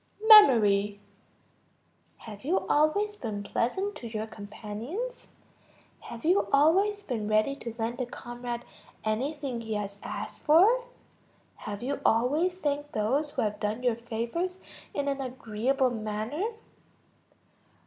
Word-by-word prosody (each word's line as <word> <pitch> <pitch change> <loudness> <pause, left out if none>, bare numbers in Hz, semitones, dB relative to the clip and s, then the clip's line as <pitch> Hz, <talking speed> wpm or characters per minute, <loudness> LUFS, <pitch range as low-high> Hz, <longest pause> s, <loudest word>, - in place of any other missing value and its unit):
Memory. 210 - +7 1.2
Have 210 -3 -11
you 340 +8 +1
always 405 +8 +2
been 215 - -5
pleasant 380 - -1
to 235 - -7
your 220 -1 -4
companions? 220 - -7 0.7
Have 235 +5 -9
you 365 +5 +3
always 385 +9 +3
been 225 - -3
ready 215 +6 +2
to 235 -4 -7
lend 235 +3 -2
a 250 - -2
comrade 240 0 -6 0.4
anything 255 +3 -2
he 220 -1 -4
has 200 -1 -4
asked - - -6
for? 410 +11 +5 0.8
Have 205 +2 -5
you 280 +3 -2
always 295 +11 +2
thanked 290 -3 -2
those 265 +8 0
who - - -2
have 210 -1 -2
done 215 +4 -2
you 245 -2 +3
favors 235 +11 -3 0.3
in 285 0 -2
an 275 -1 -1
agreeable 255 +1 0
manner? 220 - -3
245 Hz, 125 wpm, -28 LUFS, 220-305 Hz, 1.2 s, Memory